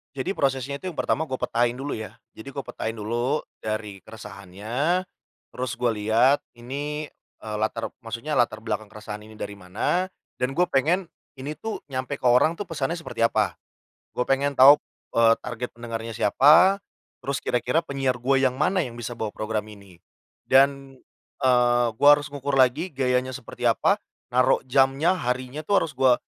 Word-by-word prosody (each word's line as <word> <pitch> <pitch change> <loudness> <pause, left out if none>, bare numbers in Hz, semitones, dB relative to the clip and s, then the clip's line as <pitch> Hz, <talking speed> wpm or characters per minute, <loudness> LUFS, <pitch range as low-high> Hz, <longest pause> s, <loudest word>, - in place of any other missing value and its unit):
Jadi, 135 +8 -2
prosesnya 135 -3 -1
itu 185 - -6
yang 170 - -5
pertama 160 +2 0
gua 130 - -2
petain 120 0 0
dulu 140 +2 -5
ya. 110 -1 -6 0.2
Jadi 110 - -12
gua 140 - -3
petain 115 +1 -5
dulu 120 +7 -1 0.2
dari 110 -2 -4
keresahannya, 110 - -3 0.5
terus 125 0 -4
gua 120 -1 +1
lihat 110 +6 +3 0.2
ini, 145 +5 -5 0.3
eee, 105 -1 -4
latar 110 +1 -2
maksudnya 115 +6 -6
latar 110 -5 +1
belakang 110 -2 -3
keresahan 105 -1 -8
ini 110 - -13
dari 100 -1 -7
mana 105 - -1 0.3
dan 125 +1 0
gue 175 +6 +2
pengen 165 +7 +1 0.3
ini 145 +3 -5
tuh 225 -1 -5
nyampe 130 +1 -4
ke 125 - +1
orang 125 +7 +4
tuh 205 - -4
pesannya 165 0 -2
seperti 115 -7 -3
apa. 105 -7 +2 0.6
Gue 125 - -2
pengen 140 +1 +1
tahu, 140 +3 +9 0.4
eee, 115 -1 +6
target 125 +1 -5
pendengarnya 115 -1 -5
siapa, 160 - +5 0.4
terus 140 -1 -2
kira-kira 125 +6 +1
penyiar 135 -4 -1
gue 135 +2 +2
yang 130 -1 +2
mana 185 +5 +2
yang 120 -2 -7
bisa 120 +1 -5
bawa 110 -2 -3
program 110 -1 -3
ini. 100 -4 -14 0.5
Dan, 135 0 +3 0.5
eee, 120 -1 +4
gua 145 +1 +8
harus 145 0 -7
ngukur 140 -1 -2
lagi 135 +7 +3
gayanya 130 -1 +1
seperti 130 -4 -3
apa, - - +2 0.3
naruh 125 +1 +4
jamnya 135 +6 +3
harinya 130 +3 -3
tuh 200 - +3
harus 155 - -4
gua 130 -1 +5
125 Hz, 165 wpm, -25 LUFS, 115-140 Hz, 0.6 s, tahu